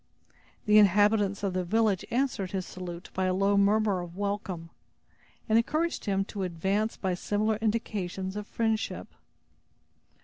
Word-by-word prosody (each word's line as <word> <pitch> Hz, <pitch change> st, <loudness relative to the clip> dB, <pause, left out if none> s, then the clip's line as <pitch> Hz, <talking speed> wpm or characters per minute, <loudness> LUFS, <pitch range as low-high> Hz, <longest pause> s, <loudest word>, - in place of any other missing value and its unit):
The 210 Hz, -1 st, +6 dB
inhabitants 205 Hz, 0 st, +3 dB
of 195 Hz, -2 st, 0 dB
the 185 Hz, 0 st, 0 dB
village 210 Hz, 0 st, +1 dB
answered 235 Hz, -7 st, -1 dB
his 190 Hz, -2 st, -2 dB
salute 175 Hz, -1 st, -8 dB
by 190 Hz, -, 0 dB
a 185 Hz, 0 st, +1 dB
low 195 Hz, +1 st, +2 dB
murmur 200 Hz, -1 st, +3 dB
of 175 Hz, 0 st, -9 dB
welcome, 200 Hz, -5 st, -3 dB, 0.8 s
and 225 Hz, 0 st, +5 dB
encouraged 310 Hz, +8 st, -1 dB
him 195 Hz, -2 st, 0 dB
to 200 Hz, -1 st, -6 dB
advance 190 Hz, +5 st, -1 dB
by 190 Hz, -2 st, -1 dB
similar 210 Hz, +4 st, 0 dB
indications 205 Hz, -4 st, -2 dB
of 210 Hz, 0 st, -5 dB
friendship. 225 Hz, -1 st, -2 dB
200 Hz, 140 wpm, -28 LUFS, 185-215 Hz, 0.8 s, The